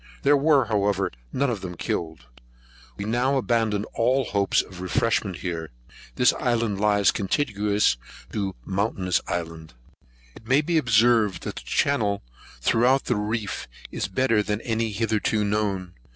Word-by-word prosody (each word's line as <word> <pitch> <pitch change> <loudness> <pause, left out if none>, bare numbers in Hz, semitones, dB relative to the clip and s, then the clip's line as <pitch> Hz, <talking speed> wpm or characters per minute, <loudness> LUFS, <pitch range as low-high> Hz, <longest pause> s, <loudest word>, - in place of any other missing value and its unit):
There 145 +1 +5
were, 145 -1 +4
however, 100 -2 0 0.2
none 140 -1 0
of 105 -5 -4
them 90 -2 -7
killed. 80 -8 -4 0.7
We 100 - -4
now 125 +5 +1
abandoned 115 -5 0
all 130 +4 +2
hopes 100 -2 +1
of 90 -1 -11
refreshment 95 0 0
here. 85 -3 -4 0.5
This 125 - +4
island 115 -5 0
lies 105 -2 +4
contiguous 105 - +1 0.4
to 100 -3 -2
Mountainous 95 -2 0
Island. 80 -5 -5 0.6
It 110 - -15
may 135 +4 +4
be 165 +1 +1
observed, 115 -5 +3
that - - -5
the - - -5
channel 110 -8 0 0.4
throughout 125 - +3
the 125 - +1
reef 105 -1 -3 0.2
is - - -2
better 115 +1 +2
than 105 0 -2
any 115 -1 -1
hitherto 110 0 0
known. 100 -4 -1
105 Hz, 140 wpm, -25 LUFS, 95-120 Hz, 0.7 s, There